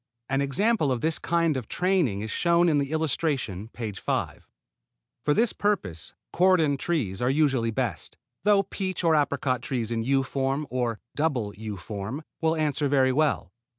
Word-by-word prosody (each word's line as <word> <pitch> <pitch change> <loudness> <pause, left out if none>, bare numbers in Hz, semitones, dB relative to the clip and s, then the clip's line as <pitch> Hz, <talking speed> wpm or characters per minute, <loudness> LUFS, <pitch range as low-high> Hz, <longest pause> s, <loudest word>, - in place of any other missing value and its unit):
An 135 +1 +1
example 150 - +2
of 125 -2 -1
this 160 0 +1
kind 170 -2 +1
of 125 -4 -4
training 175 - +1
is 110 +1 -4
shown 170 +3 +3
in 150 -2 +3
the 140 0 -2
illustration, 140 - -1
page 110 -4 -6
5. - - -3 0.8
For 150 - +2
this 230 0 +2
purpose 100 - -2 0.2
cordon 175 -5 +4
trees 130 - -2
are 125 - +2
usually 135 -5 +2
best; 115 -6 -3 0.3
though 205 -1 +4
peach 190 -2 -4
or 165 -1 +4
apricot 140 -4 +1
trees 120 -3 -3
in 115 -1 0
U 135 +3 +2
form 135 +2 -1
or 120 -3 -1 0.2
double 130 -10 0
U 105 -1 -6
form 105 - -5 0.2
will 160 0 +2
answer 150 -2 0
very 135 -2 +3
well. 145 - +1
140 Hz, 165 wpm, -26 LUFS, 115-160 Hz, 0.8 s, cordon